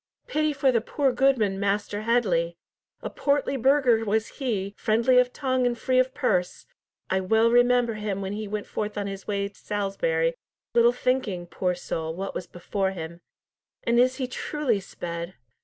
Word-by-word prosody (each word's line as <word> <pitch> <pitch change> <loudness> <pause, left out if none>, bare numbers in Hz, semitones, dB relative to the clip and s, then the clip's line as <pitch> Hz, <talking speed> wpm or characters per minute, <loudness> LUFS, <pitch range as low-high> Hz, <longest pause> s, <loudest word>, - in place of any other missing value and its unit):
"Pity 305 0 0
for 275 -2 +2
the 230 -3 +2
poor 270 +3 0
goodman, 245 -6 +2
Master 205 +1 -1
Headley. 185 -8 +1 0.5
A - - -3
portly 280 -1 0
burgher 260 -3 +3
was 220 +1 0
he, 205 -7 -2
friendly 235 +4 +3
of 250 0 +2
tongue 260 -2 0
and 240 -1 -1
free 255 +2 +2
of 255 0 +2
purse. 180 -7 0 0.5
I 190 - +3
well 220 +5 +3
remember 245 -1 +4
him 210 -2 -3
when 195 0 -3
he 215 0 -4
went 210 0 -4
forth 210 0 -4
on 205 - -1
his 195 -1 -6
way 200 -1 -1
to 200 - -15
Salisbury, 180 -6 -1 0.4
little 235 0 +5
thinking, 245 -8 -1
poor 180 +1 -1
soul, 160 -2 -4
what 195 +2 -4
was 180 - -5
before 190 +2 -2
him. 170 -1 -7 0.6
And 235 0 +2
is 255 +1 +4
he 265 - -2
truly 255 -2 -1
sped?" 170 -1 -6
215 Hz, 175 wpm, -26 LUFS, 190-250 Hz, 0.6 s, little